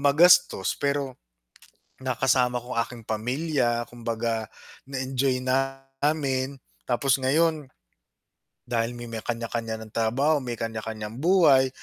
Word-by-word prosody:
magastos, 165 - +5
pero 140 -2 -1 0.8
nakasama 125 -1 +1
ko 120 -1 -6
aking 115 0 -2
pamilya. 120 +1 -1
Kumbaga 115 -1 -2 0.4
na-enjoy 130 -1 -1
namin. 135 +1 -1 0.3
Tapos 130 +2 +2
ngayon, 150 +3 +2 1.0
dahil 120 0 -1
may 120 - -7
may 115 -1 -6
kaniya-kaniya 115 -1 -3
nang 110 -1 -11
trabaho, 135 +7 +2
may 120 -2 -4
kaniya-kaniyang 110 -1 -5
buhay, 155 -7 +5
130 Hz, 100 wpm, -26 LUFS, 115-140 Hz, 1.0 s, magastos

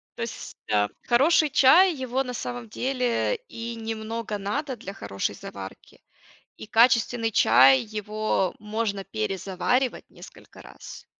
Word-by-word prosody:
То - - -8
есть, - - -7 0.2
а, 105 -1 +3 0.2
хороший 300 +5 +4
чай, 325 +7 +6
его 260 0 -2
на 250 -1 -6
самом 120 - -5
деле 255 - -1
и 230 0 -6
немного 225 -1 -5
надо 260 +8 -3
для 200 -4 -9
хорошей 100 - -4
заварки. 95 -1 -10 0.6
И - - -10
качественный 230 0 +3
чай 135 -6 +6
его 215 -3 -2
можно 210 -2 -3
перезаваривать 195 - -2
несколько - - -15
раз. - - -12
225 Hz, 125 wpm, -25 LUFS, 195-250 Hz, 0.6 s, чай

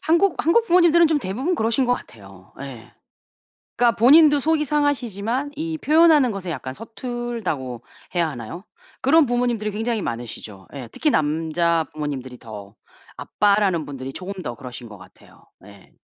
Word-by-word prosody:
한국 340 +3 +2
한국 455 +8 +3
부모님들은 340 -2 +5
좀 310 -1 +1
대부분 260 - -2
그러신 230 0 +1
것 245 - +2
같아요. 95 - -9
예. 125 -5 -9 0.9
그러니까 240 -1 +3
본인도 290 +5 +6
속이 310 +1 +1
상하시지만 270 -3 -1
이 320 +1 -3
표현하는 305 -5 +5
것에 190 -3 -6
약간 130 -3 -5
서툴다고 225 - -5 0.3
해야 170 -2 +2
하나요? 130 - -8 0.4
그런 310 +4 +5
부모님들이 240 -4 -1
굉장히 225 +1 -2
많으시죠. 110 - -7
예. 130 -4 -7
특히 305 - 0
남자 160 - +1
부모님들이 135 -5 -5
더. 105 -3 -11 0.4
아빠라는 200 -5 +1
분들이 135 -2 -7
조금 185 +5 -6
더 120 -4 -5
그러신 125 -3 -9
것 105 - -11
같아요. 90 - -19 0.2
예. 100 -2 -16
205 Hz, 360 characters per minute, -22 LUFS, -, 0.9 s, 본인도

